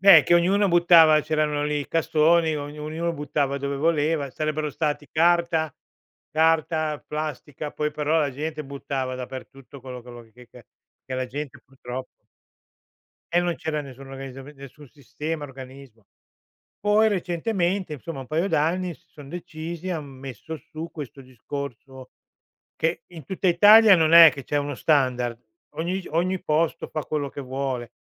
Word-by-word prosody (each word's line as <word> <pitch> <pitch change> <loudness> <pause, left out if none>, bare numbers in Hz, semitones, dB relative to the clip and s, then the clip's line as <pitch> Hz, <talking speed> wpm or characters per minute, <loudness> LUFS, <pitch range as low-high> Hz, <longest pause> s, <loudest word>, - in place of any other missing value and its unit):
Beh, 190 -5 +9
che 175 - +4
ognuno 190 +4 +3
buttava 170 -3 +6
c'erano 150 -1 0
lì 150 0 -1
i 145 - -6
cassoni, 160 0 +3
ognu 145 +1 -7
ognuno 160 +3 -2
buttava 145 -2 -1
dove 140 0 -3
voleva, 150 -1 +1
sarebbero 155 +2 -2
stati 150 0 -2
carta 170 -2 +2 0.6
carta, 155 -1 +1
plastica, 150 -1 -5
poi 150 0 -1
però 155 +2 +1
la 145 -3 +1
gente 155 +3 -4
buttava 135 -1 -4
dappertutto 130 +2 -9
quello 130 -1 -8
quello 120 0 -11
che 125 +1 -16
ca 125 - -15 0.4
che 130 - -5
la 130 0 -2
gente 140 +2 -7
purtroppo 130 0 -7 1.3
E 175 - +5
non 175 -1 0
c'era 155 -1 -3
nessuna 135 -1 -10
organizzam 135 0 -8
nessun 140 0 -13
sistema, 150 +3 -5
organismo. 130 -4 -12 0.7
Poi 210 +2 +3
recentemente, 185 -2 -1
insomma, 145 +1 -7
un 130 - -10
paio 165 +4 0
d'anni, 175 +1 0
si - - -27
son 145 -3 -13
decisi, 170 +1 -6
han 160 -4 -3
messo 135 +2 -8
su 155 +2 -8
questo 145 -3 -8
discorso 130 0 -8 0.6
che 165 +2 -1
in 165 -4 -11
tutta 190 +5 -3
Italia 205 +4 +8
non 160 -2 +3
è 165 -2 +10
che 140 - -8
c'è 145 - -2
uno 145 0 -1
standard, 125 -5 +1 0.4
ogni 180 +4 -2
ogni 180 +4 0
posto 165 0 0
fa 155 - -3
quello 150 -2 -2
che 140 - -8
vuole 130 -3 -4
150 Hz, 150 wpm, -24 LUFS, 135-165 Hz, 1.3 s, è